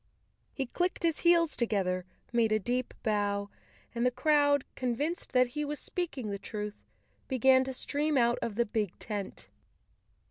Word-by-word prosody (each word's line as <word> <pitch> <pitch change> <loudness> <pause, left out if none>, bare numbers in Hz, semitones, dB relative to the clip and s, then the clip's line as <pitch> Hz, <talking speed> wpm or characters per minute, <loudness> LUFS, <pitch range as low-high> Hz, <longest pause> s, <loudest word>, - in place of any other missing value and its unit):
He 270 - -3
clicked 350 +9 -1
his 330 -2 +2
heels 340 -2 +4
together, 190 -6 0 0.3
made 230 -2 +3
a 215 - +4
deep 245 +4 -2
bow 205 -1 0 0.4
and 235 0 -1
the 250 - +5
crowd, 285 +2 +3
convinced 270 +7 -2
that 250 -1 +4
he 300 +5 -3
was 295 0 -4
speaking 275 - -3
the 200 - -4
truth, 210 -1 -6 0.5
began 260 0 +5
to 265 - -3
stream 290 +3 0
out 235 -1 +3
of 220 - -3
the 235 +2 +2
big 210 -4 -2
tent. 205 -3 -6
245 Hz, 155 wpm, -30 LUFS, 215-290 Hz, 0.5 s, the